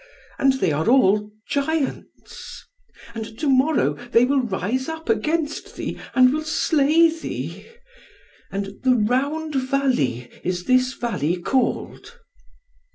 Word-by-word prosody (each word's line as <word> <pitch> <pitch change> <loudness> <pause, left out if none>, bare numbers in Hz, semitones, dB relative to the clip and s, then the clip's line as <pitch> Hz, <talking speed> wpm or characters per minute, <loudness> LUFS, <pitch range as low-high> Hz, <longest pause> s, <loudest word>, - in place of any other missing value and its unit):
And 270 -1 +4
they 260 -11 0
are 155 +8 0
all 210 -5 +4 0.2
giants. 285 0 -4 0.5
And 220 -1 -7
to 305 - -2
morrow 275 +3 +3 0.2
they 240 0 +5
will 275 +1 +2
rise 240 - -2
up 320 -4 -7
against 300 +8 -1
thee, - - -5 0.2
and 255 0 +6
will 310 - -1
slay 315 +1 +3
thee. 325 - -6 0.8
And 195 0 -5
the 255 -1 +3
Round 280 +8 0
Valley 260 - 0 0.2
is 180 0 -2
this 255 0 +2
valley 180 - -1
called." 265 - -2
255 Hz, 120 wpm, -22 LUFS, 210-290 Hz, 0.8 s, and